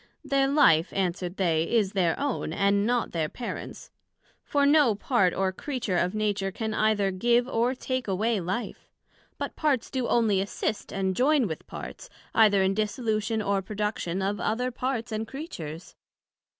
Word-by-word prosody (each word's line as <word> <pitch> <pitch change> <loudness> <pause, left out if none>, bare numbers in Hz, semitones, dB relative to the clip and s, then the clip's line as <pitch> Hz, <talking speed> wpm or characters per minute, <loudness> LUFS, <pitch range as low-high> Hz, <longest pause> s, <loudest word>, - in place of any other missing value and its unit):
Their 275 0 +2
life, 190 - +4
answered 180 -1 -2
they, 165 -4 +2
is 215 -5 +2
their 180 -5 +1
own, 280 - -2
and 200 +2 +2
not 245 -1 0
their 160 -2 -1
Parents; 245 - -7 0.5
for 285 -1 +1
no 285 -6 +5
part 200 -3 +2
or 190 +1 0
creature 235 -2 -3
of 180 +3 0
Nature 205 -2 0
can 220 +2 -3
either 215 -3 +2
give 240 +6 +2
or 245 0 +1
take 255 -1 -3
away 210 +3 +1
life; 190 +7 -4 0.5
but - - -4
parts 285 -7 0
do 260 -3 -1
onely 215 -5 +2
assist 205 +1 -3
and 190 -1 -1
join 275 +2 +3
with 160 -6 -6
parts, - - -8 0.2
either 205 -3 +5
in 190 0 +2
dissolution 215 +1 -1
or 200 -1 +1
production 195 -2 -3
of 200 +1 -1
other 250 +4 -1
Parts 245 -1 -3
and 220 +1 -3
Creatures. 180 - -7
215 Hz, 160 wpm, -27 LUFS, 190-245 Hz, 0.5 s, no